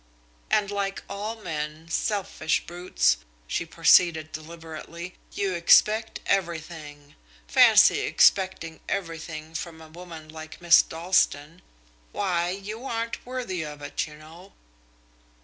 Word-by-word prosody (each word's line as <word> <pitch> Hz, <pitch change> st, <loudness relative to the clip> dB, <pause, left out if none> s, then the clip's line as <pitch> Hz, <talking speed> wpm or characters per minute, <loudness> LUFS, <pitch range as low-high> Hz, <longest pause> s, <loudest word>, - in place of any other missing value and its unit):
"And 205 Hz, -1 st, +2 dB
like 200 Hz, -1 st, -3 dB
all 210 Hz, +3 st, -4 dB
men 155 Hz, -5 st, -5 dB
selfish 165 Hz, -4 st, -1 dB
brutes!" 175 Hz, -, +1 dB, 0.3 s
she 170 Hz, -, -3 dB
proceeded 165 Hz, -1 st, +4 dB
deliberately 165 Hz, +2 st, -8 dB, 0.2 s
"you 195 Hz, -2 st, -1 dB
expect 215 Hz, +6 st, +4 dB
everything. 160 Hz, -5 st, -3 dB, 0.3 s
Fancy -, -, +6 dB
expecting 185 Hz, -4 st, +2 dB
everything 165 Hz, -4 st, -5 dB
from 165 Hz, 0 st, -6 dB
a 160 Hz, -1 st, -13 dB
woman 165 Hz, -1 st, -10 dB
like 155 Hz, 0 st, -10 dB
Miss 170 Hz, -1 st, +7 dB
Dalstan! 165 Hz, -2 st, 0 dB, 0.5 s
Why, 175 Hz, -3 st, 0 dB
you 205 Hz, +5 st, -6 dB
aren't 230 Hz, -1 st, -3 dB
worthy 245 Hz, -9 st, -3 dB
of 150 Hz, -1 st, -8 dB
it, 145 Hz, -, -3 dB
you 150 Hz, -, -12 dB
know." 165 Hz, +5 st, -14 dB
170 Hz, 115 wpm, -26 LUFS, 155-195 Hz, 0.5 s, Miss